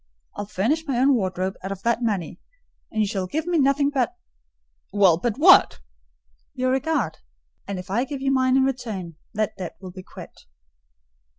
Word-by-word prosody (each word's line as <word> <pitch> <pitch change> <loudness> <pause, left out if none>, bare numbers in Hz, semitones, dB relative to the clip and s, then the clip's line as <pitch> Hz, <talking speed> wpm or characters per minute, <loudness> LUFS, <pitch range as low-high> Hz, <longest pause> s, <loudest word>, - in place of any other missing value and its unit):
I'll 205 - -5
furnish 280 - -1
my 265 -4 0
own 270 +3 +4
wardrobe 190 -4 -1
out 195 - -5
of 195 -1 -6
that 235 +1 +1
money, 195 -8 -2 0.5
and 220 - -1
you - - 0
shall 195 -3 -2
give 315 - -2
me 345 -2 +1
nothing 280 +1 +3
but—" 275 +5 0 0.8
"Well, 190 -5 +4
but 230 +3 -1
what?" 335 - +6 0.8
"Your 255 0 0
regard; 290 +5 -1 0.5
and 200 - -4
if 180 0 -8
I 240 +6 +1
give 275 +1 -5
you 270 0 0
mine 260 -1 +3
in 265 - +4
return, 215 - -3 0.2
that 215 -1 -1
debt 180 -3 -6
will 185 -2 -9
be 185 +1 -9
quit." - - -13
235 Hz, 180 wpm, -23 LUFS, 190-270 Hz, 0.8 s, what